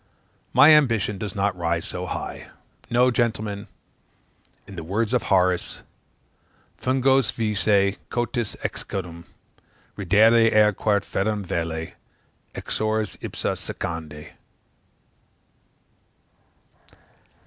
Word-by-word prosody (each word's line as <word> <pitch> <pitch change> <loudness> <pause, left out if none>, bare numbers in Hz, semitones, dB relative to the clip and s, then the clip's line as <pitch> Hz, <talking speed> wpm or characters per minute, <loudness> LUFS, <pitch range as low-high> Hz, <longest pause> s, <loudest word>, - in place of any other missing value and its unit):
My 145 +5 +7
ambition 115 -9 +2
does 105 -3 -5
not 100 -1 0
rise 85 -1 -1
so 90 0 -5
high. - - -6 0.4
No, 125 +1 +3
gentlemen, 110 -4 -2 1.0
in 100 - -11
the 85 - -6
words 105 +7 -1
of 125 - +3
Horace, 90 -1 0 0.4
" - - -37
fungos 130 -2 +2
vice 105 -3 +1
cotis, 120 -2 -2
excutum 85 -3 -5 0.7
Reddere 110 +4 +4
ere 105 0 +5
quæ 100 +1 0
ferrum 105 +1 -2
valet, 80 -1 -3 0.6
exsors 110 -1 -2
ipsa - - -3
secandi." 80 -3 -6
105 Hz, 95 wpm, -24 LUFS, 90-115 Hz, 1.0 s, My